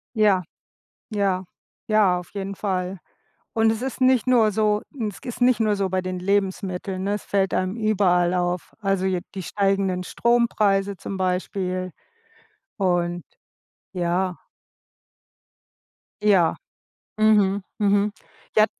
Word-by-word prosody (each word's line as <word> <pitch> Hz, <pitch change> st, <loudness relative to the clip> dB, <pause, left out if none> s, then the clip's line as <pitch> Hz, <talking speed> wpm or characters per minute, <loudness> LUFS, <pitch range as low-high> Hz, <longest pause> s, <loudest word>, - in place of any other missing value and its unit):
Ja, 205 Hz, -4 st, +4 dB, 0.7 s
ja, 190 Hz, -2 st, +1 dB, 0.4 s
ja, 205 Hz, -5 st, +3 dB
auf 180 Hz, -, -10 dB
jeden 200 Hz, -1 st, -4 dB
Fall. 185 Hz, -2 st, -2 dB, 0.6 s
Und 225 Hz, 0 st, +3 dB
es 225 Hz, +1 st, -3 dB
ist 265 Hz, 0 st, -4 dB
nicht 255 Hz, -1 st, +4 dB
nur 230 Hz, -4 st, +4 dB
so 210 Hz, 0 st, +1 dB, 0.3 s
es 200 Hz, -, -10 dB
ist 245 Hz, 0 st, -7 dB
nicht 245 Hz, -2 st, +4 dB
nur 215 Hz, -2 st, +2 dB
so 195 Hz, -1 st, -1 dB
bei 185 Hz, 0 st, 0 dB
den 185 Hz, 0 st, -4 dB
Lebensmitteln, 190 Hz, -1 st, -1 dB
ne, 200 Hz, +1 st, 0 dB
es 210 Hz, -, -3 dB
fällt 195 Hz, -2 st, 0 dB
einem 185 Hz, +2 st, 0 dB
überall 190 Hz, -5 st, +2 dB
auf. 180 Hz, 0 st, -2 dB
Also, 195 Hz, -2 st, 0 dB
je 185 Hz, -2 st, 0 dB
die 190 Hz, -, -4 dB
steigenden 195 Hz, -2 st, 0 dB
Strompreise 205 Hz, -4 st, +1 dB
zum 195 Hz, -, -6 dB
Beispiel 185 Hz, 0 st, -2 dB, 0.9 s
und 175 Hz, -3 st, 0 dB, 0.7 s
ja. 180 Hz, 0 st, -1 dB, 1.9 s
Ja. 190 Hz, -6 st, +4 dB, 0.6 s
Mhm, 205 Hz, -2 st, +3 dB, 0.2 s
mhm, 205 Hz, 0 st, +3 dB, 0.5 s
ja 215 Hz, 0 st, +7 dB
195 Hz, 125 wpm, -23 LUFS, 185-210 Hz, 1.9 s, ja